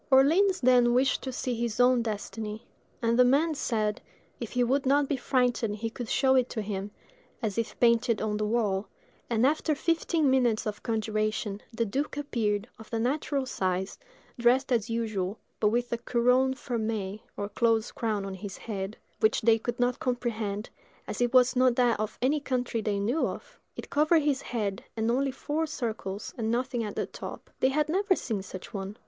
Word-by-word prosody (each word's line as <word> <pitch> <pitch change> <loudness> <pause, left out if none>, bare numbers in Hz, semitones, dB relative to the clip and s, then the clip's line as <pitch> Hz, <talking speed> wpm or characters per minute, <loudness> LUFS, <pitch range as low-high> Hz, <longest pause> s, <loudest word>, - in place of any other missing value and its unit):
Orleans 335 +9 +5
then 245 -1 +5
wished 260 +2 +2
to 260 - -4
see 255 0 -2
his 235 -1 -2
own 245 0 +5
destiny; 215 0 -5 0.4
and 230 +1 +2
the - - +9
man 290 +6 +3
said, 215 -7 -1 0.4
if 235 - -6
he 250 -1 +2
would 265 +3 +1
not 285 +1 +4
be 285 - 0
frightened 245 -4 +1
he 225 +1 -4
could 235 -1 -6
show 265 -1 +3
it 255 -1 +3
to 220 - -3
him, 200 -1 -4 0.5
as 210 -3 -1
if 230 - -3
painted 235 -1 +3
on 210 -1 -1
the 215 - 0
wall; 210 -3 0 0.4
and 235 +1 +2
after 305 +2 +2
fifteen 330 0 +1
minutes 250 -4 +2
of 210 -1 -4
conjuration, 215 -2 -1
the 230 0 -1
duke 275 +7 -2
appeared, 220 -7 -1
of 220 - -12
the 230 - -2
natural 275 +3 0
size, 190 -5 -2 0.4
dressed 255 +3 +3
as 230 -2 +1
usual, 220 -4 -2 0.2
but 210 - +3
with 240 +2 0
a 235 - -1
couronne 250 +2 +2
fermée 220 -6 -3 0.2
or 205 - -2
closed 225 +1 +1
crown 215 -4 -1
on 195 - -5
his 190 0 -7
head, 200 -1 -5 0.2
which 220 0 +3
they 225 0 +4
could 240 +2 -4
not 245 0 +1
comprehend, 225 -4 -2 0.4
as - - -4
it 240 -1 +2
was 255 0 +5
not 255 -1 +4
that 240 -3 +3
of 215 -1 -3
any 290 +4 +3
country 250 -4 -1
they 210 -1 -1
knew 240 +10 +1
of. - - -8 0.2
It - - -8
covered 310 +2 +4
his 285 -2 +1
head, 205 -5 -3
had 225 +1 +1
only 270 +3 +1
four 300 +4 -2
circles, 220 -8 -4
and 220 -1 0
nothing 245 0 0
at 210 -2 -5
the - - -1
top. - - -9
They 260 - +4
had 300 +2 +1
never 380 +4 +2
seen 220 - -3
such 185 +2 -9
a - - -22
one. 200 0 -5
235 Hz, 190 wpm, -28 LUFS, 215-260 Hz, 0.5 s, the